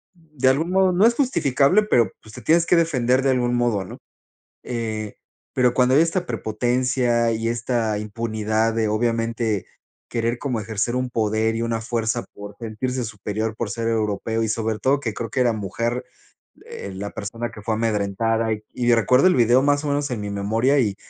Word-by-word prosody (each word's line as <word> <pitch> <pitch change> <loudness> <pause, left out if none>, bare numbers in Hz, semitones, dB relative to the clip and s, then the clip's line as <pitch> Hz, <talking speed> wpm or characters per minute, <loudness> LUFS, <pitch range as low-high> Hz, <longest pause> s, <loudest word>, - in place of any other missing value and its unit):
de 155 -6 -3
algún 150 +7 +2
modo 190 0 +4
no 185 +4 +4
es 235 - +3
justificable, 170 - +3
pero, 120 - +2
pues, 110 - -14
te 125 - -9
tienes 165 +9 +3
que 175 - +3
defender 130 -7 +2
de 135 - +2
algún 120 -1 +1
modo, 120 -5 0
¿no?, - - -10 0.6
eh, 110 -3 -4 0.4
pero 125 -1 +3
cuando 125 +1 +3
hay 150 - +6
esta 170 +2 0
prepotencia 120 +2 0
y 115 +1 -2
esta 115 -2 -1
impunidad 110 +1 -1
de 110 -1 0
obviamente 115 -2 0 0.4
querer 115 0 -1
como 125 -5 -2
ejercer 110 +3 -2
un 125 0 -1
poder 110 -1 0
y 115 - -2
una 115 -1 -1
fuerza 115 0 -1
por 105 0 -10
sentirse 125 +3 -3
superior 105 +1 -4
por 115 - -3
ser 115 +2 -3
europeo 110 0 -1
y - - 0
sobre 110 0 -1
todo, 135 +1 +2
que 110 -5 -3
creo 115 +1 -5
que 130 - -1
era 120 -1 +3
mujer, 115 +4 -3 0.6
eh, 100 - -7
la 100 +2 -5
persona 115 +4 -5
que 105 - -11
fue 110 +2 -1
amedrentada 110 +1 0 0.2
y 120 -1 +1
recuerdo 125 +6 +4
el 185 - +3
video 120 +1 +4
más 145 +1 +2
o - - -2
menos 145 0 -1
en 115 - -3
mi 105 0 -4
memoria 110 +8 +1
y 105 -5 0
115 Hz, 190 wpm, -22 LUFS, 110-130 Hz, 0.6 s, hay